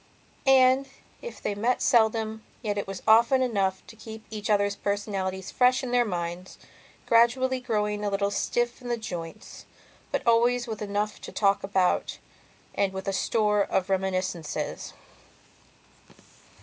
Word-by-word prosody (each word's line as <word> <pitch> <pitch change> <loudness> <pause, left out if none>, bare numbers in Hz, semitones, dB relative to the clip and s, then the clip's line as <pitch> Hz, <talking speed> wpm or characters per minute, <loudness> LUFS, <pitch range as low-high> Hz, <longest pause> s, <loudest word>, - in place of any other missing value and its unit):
And, 265 0 +5 0.3
if 480 - -8
they - - -1
met 230 +5 0
seldom, 220 -2 +2 0.2
yet 210 -2 -1
it 200 - -3
was 195 -1 -7
often 235 +4 +5
enough 195 -6 -1
to 225 - -13
keep 220 0 -10
each 215 -1 -5
other's 200 -1 +2
personalities 195 -2 -3
fresh 255 +1 +3
in 250 - -4
their 245 -1 +3
minds, 175 -2 -5 0.5
gradually 255 +3 +3
growing 210 -4 -1
a 205 - 0
little 200 0 0
stiff 240 +4 -1
in 250 - -9
the 240 - 0
joints, 175 -7 -8 0.4
but - - -2
always 240 +1 +3
with 220 -3 -6
enough 205 +1 -2
to - - -8
talk 200 -1 +1
about 190 -2 0 0.6
and 195 -1 0
with 190 0 -6
a 195 - 0
store 210 +1 +1
of 190 0 -1
reminiscences. 185 -4 -2
210 Hz, 145 wpm, -26 LUFS, 195-240 Hz, 0.6 s, And